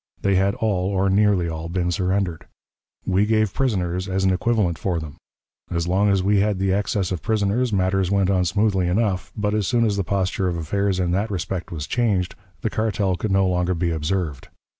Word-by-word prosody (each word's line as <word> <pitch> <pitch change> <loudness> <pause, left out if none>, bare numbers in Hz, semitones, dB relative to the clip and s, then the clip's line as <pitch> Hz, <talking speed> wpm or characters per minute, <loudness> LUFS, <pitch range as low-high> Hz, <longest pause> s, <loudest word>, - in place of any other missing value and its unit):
They 100 - +2
had 95 +1 +2
all, 95 -4 0
or 95 -1 +1
nearly 100 -3 +3
all, 80 0 -5
been 90 0 -1
surrendered. 90 -1 -1 0.6
We 95 +2 +2
gave 110 -2 +2
prisoners 95 -7 -1
as 95 0 0
an 95 -1 +3
equivalent 95 -4 0
for 90 -4 -1
them. 80 -1 -8 0.5
As 85 -1 -2
long 100 +3 +2
as 95 -2 +2
we 100 +1 +3
had 105 0 +1
the 95 0 +1
excess 100 -1 -1
of 90 - -3
prisoners, 110 +3 0
matters 95 -1 +1
went 100 -1 +2
on 90 -2 +2
smoothly 95 0 +1
enough; 95 0 0
but, 105 0 0
as 105 -3 0
soon 120 -2 +2
as 105 -2 0
the 100 - 0
posture 95 0 -1
of 85 -1 -1
affairs 95 +4 -1
in 90 -1 0
that 100 +5 0
respect 90 -1 -4
was 75 -4 -4
changed, 100 -6 0 0.3
the 110 - 0
cartel 100 -3 0
could 95 +4 -3
no 95 0 +3
longer 90 0 0
be 85 0 0
observed. 80 -2 -2
95 Hz, 205 wpm, -22 LUFS, 90-100 Hz, 0.6 s, nearly